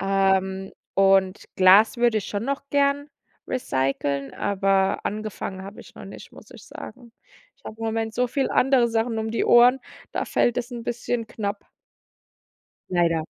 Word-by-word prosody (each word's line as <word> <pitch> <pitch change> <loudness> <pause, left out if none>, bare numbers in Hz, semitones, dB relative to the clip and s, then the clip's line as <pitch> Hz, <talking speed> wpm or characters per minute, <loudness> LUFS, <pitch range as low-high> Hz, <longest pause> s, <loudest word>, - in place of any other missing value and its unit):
ähm, 190 0 0 0.2
und 195 0 +3
Glas 195 +4 +6
würde 235 -2 +3
ich 205 - -6
schon 205 0 -3
noch 280 +1 -4
gern 285 +1 +1 0.4
recyceln, 140 - -2
aber 195 -1 +1
angefangen 210 -2 -5
habe 195 +2 -10
ich - - -16
noch - - -11
nicht, - - -12
muss - - -15
ich - - -13
sagen. 235 +1 -11 0.4
Ich - - -34
habe 220 - -8
im 225 - -5
Moment 225 0 -2
so 250 +2 0
viele 270 +2 -1
andere 255 -2 +3
Sachen 225 0 -1
um 220 0 -3
die 230 - -1
Ohren, 245 +2 +6 0.3
da - - -2
fällt 240 - +1
es 245 0 -4
'n 240 -1 -6
bisschen 240 -1 -3
knapp. 205 -1 -5 1.2
Leider. 170 -3 +1
215 Hz, 160 wpm, -24 LUFS, 195-240 Hz, 1.2 s, Glas